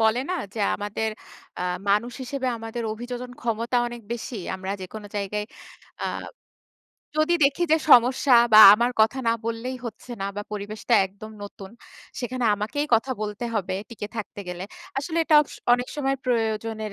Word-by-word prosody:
বলে 220 +2 +3
না - - 0 0.2
যে, - - -6 0.2
আমাদের 210 +2 -2 0.5
অ্যা 180 - -3 0.3
মানুষ 235 +4 +2
হিসেবে 260 +1 -3
আমাদের 225 +1 -5
অভিযোজনন 245 +2 -6
ক্ষমতা 235 +1 -1
অনেক 240 -1 -7
বেশি 235 0 -5 0.2
আমরা 190 +1 -5
যেকোনো 205 +3 -8
জায়গায় 210 +1 -2 0.6
আ - - 0 1.1
যদি 310 +3 +3
দেখি 280 +5 +2
যে - - +7
সমস্যা 250 +2 +6 0.2
বা 215 - +9 0.2
আমার 240 +3 +1
কথা 220 +5 +3
না - - +4
বললেই 230 +3 -3
হচ্ছে 230 +2 -9
না - - -1
বা 205 - -2
পরিবেশটা 210 +3 -2
একদম 200 +3 -11
নতুন 200 -1 -9 0.5
সেখানে 250 0 -3
আমাকেই 220 +9 -2
কথা 245 +4 +1
বলতে 210 +3 -4
হবে 185 -3 -1 0.2
টিকে 210 -2 -6
থাকতে 205 -1 -5
গেলে। 180 +1 -5 0.3
আসলে 325 +4 -2
এটা 310 - +3
ওকস - - -12 0.2
অনেক 245 +1 +2
সময় 270 -1 0
প্রয়োজনের 220 -3 -1
230 Hz, 160 wpm, -25 LUFS, 210-250 Hz, 1.1 s, বা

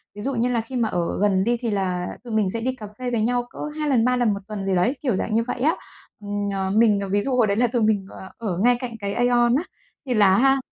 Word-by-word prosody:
ví 205 - -7
dụ 270 +2 -2
như 240 +2 +1
là 235 -2 +1
khi 255 +3 -9
mà 230 -3 +1
ở 175 +1 -2
gần 190 -2 +3
đi, 240 +2 +1
thì 235 -3 -2
là 185 -3 -1 0.2
tụi 235 -3 -7
mình 210 -3 +2
sẽ 230 +3 -2
đi 260 +2 -1
cà 215 -4 -8
phê 250 -1 -3
với 230 -2 0
nhau 245 +2 0
cỡ - - -16 0.2
2 300 -1 -1
lần, 240 -3 +3
3 250 0 +3
lần 240 -4 +2
một 200 - -4
tuần 205 -2 -5
gì 190 -1 +1
đấy, 235 +11 +2
kiểu 245 -8 +1
dạng 215 - -2
như 230 +1 +2
vậy 245 - -3
á. 315 +4 +3 0.5
Ừm, 205 0 -3
ờ, 190 -1 -1
mình 210 0 +4
ví 205 0 +2
dụ 265 +1 -1
hồi 230 -4 +3
đấy 200 +1 0
là 245 0 +3
tụi 240 0 -1
mình, 205 -3 +1
ờ, 190 - -10
ở 200 -7 -3
ngay 245 +5 +4
cạnh 240 -3 -5
cái 200 0 -3
AEON 240 0 +3
á, 310 - +1 0.4
thì 250 - -1
là 205 -4 +5
á - - +4
ha 270 +1 +4
225 Hz, 300 wpm, -23 LUFS, 200-245 Hz, 0.5 s, là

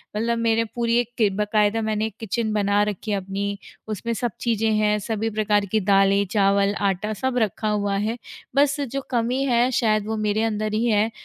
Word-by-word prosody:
मतलब 230 +2 0
मेरे 230 0 +2
पूरी 235 -1 +1
एक 240 0 -3
के 215 -3 +3
बाकायदा 210 +2 +1
मैंने 215 0 -1
किचन 220 0 -2
बना 205 0 +2
रखी 210 +1 -3
है 200 - +1
अपनी 200 +1 -3 0.3
उसमें 220 +2 -3
सब 235 +1 -2
चीज़ें 225 -2 +1
हैं, 210 0 +2
सभी 220 +1 -2
प्रकार 210 -1 +1
की 220 - +3
दालें, 195 0 +3
चावल, 200 -1 +3
आटा 200 +2 -1
सब 250 +4 -2
रखा 215 -1 0
हुआ 205 -1 0
है, 220 +4 -1 0.4
बस 285 +1 +3
जो 275 0 -3
कमी 250 +2 0
है 245 0 +3
शायद 215 -4 +1
वो 220 - -2
मेरे 215 +1 0
अंदर 215 -1 -1
ही 225 +2 +1
है, 215 0 +2
215 Hz, 190 wpm, -23 LUFS, 205-230 Hz, 0.4 s, के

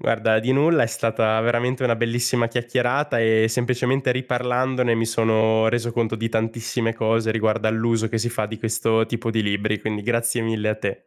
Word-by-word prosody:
Guarda, 110 -1 +1
di 125 +4 0
nulla, 155 +3 +3
è - - +2
stata 110 -1 0
veramente 120 +3 0
una 115 -2 +2
bellissima 120 +1 0
chiacchierata 120 +2 0
e 110 0 +3
semplicemente 125 +2 0
riparlandone 125 -1 0
mi 115 0 0
sono 110 0 +2
reso 120 0 -1
conto 115 -1 -1
di 115 +1 -2
tantissime 115 +1 -2
cose 115 0 0
riguardo 110 0 0
all'uso 115 0 0
che 115 0 -2
si 120 - -1
fa 110 -3 -2
di 110 +1 -8
questo 115 0 0
tipo 115 0 -3
di 110 -1 0
libri, 105 +1 -1
quindi 105 -1 -4
grazie 115 +1 0
mille 110 -1 -1
a 105 - +1
te. 100 -2 -5
115 Hz, 185 wpm, -22 LUFS, 110-120 Hz, -, nulla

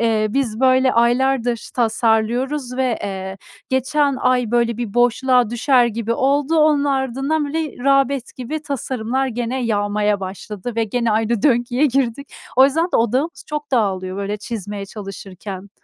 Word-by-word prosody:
Eee, 220 -2 +2
biz 235 -3 -1
böyle 260 0 +4
aylardır 240 0 +1
tasarlıyoruz 240 +3 0
ve, 255 -3 0
eee, 190 -1 -5 0.3
geçen 275 +2 +1
ay 250 -3 +2
böyle 235 -1 +1
bir 235 -4 -5
boşluğa 245 0 +3
düşer 245 +1 +3
gibi 230 0 -2
oldu, 285 +5 +1
onun 300 -2 +4
ardından 270 +3 0
böyle 300 -4 -4
rağbet 275 -2 +1
gibi 295 +5 -5
tasarımlar 265 -2 -2
gene 245 +1 -2
yağmaya 205 -1 0
başladı 200 +4 -6
ve 225 - +2
gene 235 +2 -1
aynı 220 0 0
döngüye 245 +1 +2
girdik. 270 0 -1 0.2
O 260 - +8
yüzden 315 +5 +2
de - - +4
odağımız 255 +8 0
çok 300 -1 -5
dağılıyor 190 -6 0
böyle 200 +1 -3
çizmeye 205 -2 -6
çalışırken. 195 -1 -8
240 Hz, 145 wpm, -20 LUFS, 220-270 Hz, 0.3 s, O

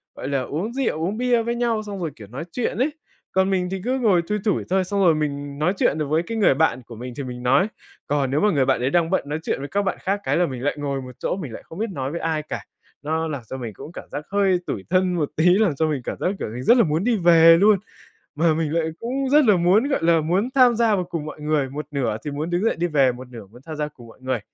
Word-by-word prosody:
gọi - - -6
là, 135 -2 0
uống 170 - -4
rượu, 230 - -1
uống 200 +5 -1
bia 245 -2 +2
với 235 +1 -2
nhau, 230 -3 0
xong 200 -2 -6
rồi, 160 -3 -2
kiểu, 105 - -12
nói 125 +8 -6
chuyện 245 - -2
ấy. 265 +5 +2 0.4
Còn 190 +1 +2
mình 185 -2 0
thì 190 -1 -3
cứ 260 +1 0
ngồi 195 -8 +3
thui 210 0 0
thủi 205 - +1
thôi, 190 0 +2
xong 200 +2 -1
rồi 165 -3 +5
mình 145 -1 -3
nói 175 +5 +2
chuyện 150 - +2
được 150 -2 -2
với 160 +3 +1
cái 225 +4 -5
người 200 -10 +4
bạn 130 -4 +1
của 115 - -9
mình 125 +2 -7
thì 140 - -3
mình 125 -1 -7
nói. 135 +11 +3 0.4
Còn 140 -2 0
nếu 145 - +2
mà 210 0 +4
người 135 -5 +2
bạn 130 -2 +1
ấy 130 - +1
đang 170 +1 +2
bận 190 - +1
nói 150 +2 -2
chuyện - - -2
với 140 - -5
các 200 - 0
bạn 190 - -1
khác 195 +2 -1
cái - - +1
là 175 - +3
mình 130 -3 -6
lại 145 - 0
ngồi 140 -2 -3
một 125 0 -9
chỗ, - - -1
mình 140 -11 -6
lại - - -9
không 165 - -10
biết 225 0 -1
nói 135 -3 -4
với 170 - -4
ai 160 -2 -1
cả. - - -6 0.4
Nó 160 +2 -1
làm 145 -5 -4
cho 130 - -5
mình 115 -4 -6
cũng 155 - -10
cảm - - -10
giác 150 - -5
hơi 195 -3 +2
tủi 95 - -3
thân 185 0 +2
một 155 -4 -1
tí, 160 - +2
làm 180 -3 +4
cho 160 +2 +1
mình 145 -4 -1
cảm - - -4
giác - - -1
kiểu - - -3
mình 125 +2 -5
rất 240 - +6
là 235 - +6
muốn 155 +1 0
đi 235 -1 +2
về 165 -2 +7
luôn. 205 0 +5 0.6
Mà 160 +1 +3
mình 155 -1 -1
lại 165 -1 +1
cũng 260 +3 -2
rất 295 -1 +5
là 210 -3 +5
muốn, 190 +10 +3
gọi 275 - 0
là, 165 -1 +4
muốn 185 +10 0
tham 250 -3 +6
gia 225 -2 +3
vào 185 - -1
cùng 165 -4 -5
mọi 155 - -8
người, 150 -3 0
một 150 +3 -5
nửa 120 -7 -1
thì 145 - -3
muốn 155 +4 -3
đứng 175 +4 0
dậy - - +2
đi 175 +2 -1
về, 140 -5 +3
một 125 +1 -10
nửa 115 -5 -10
muốn 120 +6 -17
tham 160 - -6
gia 150 0 -2
cùng 120 -6 -14
mọi 115 - -16
người. 130 -2 -1
165 Hz, 300 wpm, -23 LUFS, 140-195 Hz, 0.6 s, về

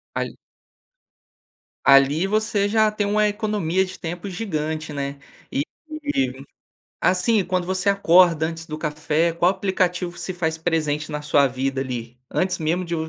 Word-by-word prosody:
Ali - - -3 1.5
ali 140 +5 +5
você 210 0 +1
já 215 0 +3
tem 210 -1 -1
uma 210 +1 +3
economia 205 -4 0
de 185 0 -9
tempo 175 +3 -5
gigante, 160 -5 -3
né? 140 0 -4 0.3
E 140 - +1 0.5
e 130 0 -1 0.6
assim, 185 +3 +2
quando 180 -1 -1
você 190 +2 0
acorda 175 -4 +5
antes 165 0 -6
do 155 - -5
café, 155 +2 0
qual 170 +2 +3
aplicativo 185 -2 -1
se 185 - -4
faz 160 -2 -1
presente 155 -2 -1
na 150 - -3
sua 145 -1 +4
vida 135 +1 -2
ali? 125 -2 -5
Antes 185 0 0
mesmo 170 +3 0
de 170 - -3
170 Hz, 145 wpm, -23 LUFS, 150-190 Hz, 1.5 s, ali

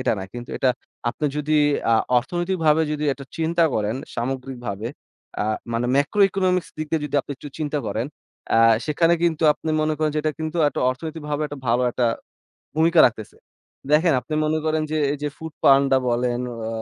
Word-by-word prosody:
এটা 130 - +1
না। - - -4
কিন্তু 120 0 -8
এটা 130 - +2 0.4
আপনি 150 +5 -2
যদি 150 +1 -1 0.4
আ - - +5 0.3
অর্থনৈতিকভাবে 165 +2 +1
যদি 150 0 -2
এটা 140 +1 -9
চিন্তা 165 +1 +2
করেন 110 +3 -1 0.2
সামগ্রিকভাবে 120 -4 -4 0.5
আ - - +2 0.3
মানে 120 +1 0
macro 145 +9 +1
economics 185 -2 0
দিক 155 - -3
দিয়ে 160 - +1
যদি 145 - -9
আপনি 145 - -13
একটু 145 - -9
চিন্তা 150 -1 -1
করেন, 110 +4 -2 0.5
আ - - +5 0.3
সেখানে 165 +3 +3
কিন্তু 165 -2 +1
আপনি 160 - -5
মনে 155 0 +1
করেন 155 -1 +1
যে - - +1
এটা 155 0 0
কিন্তু 160 +1 -3
একটা - - -4
অর্থনৈতিকভাবে 150 +2 -4
একটা 145 -1 -8
ভালো 120 +2 +2
একটা 120 - -1 0.7
ভূমিকা 160 +1 +4
রাখতেছে। 110 -3 -5 0.5
দেখেন 160 +3 +4
আপনি 155 - -5
মনে 155 +1 +1
করেন 155 0 +1
যে 155 - -1 0.2
এই 145 - -4
যে 150 - 0
Foodpanda 140 -4 +3
বলেন, 120 0 0 0.3
আ - - -2
150 Hz, 180 wpm, -23 LUFS, 125-160 Hz, 0.7 s, আ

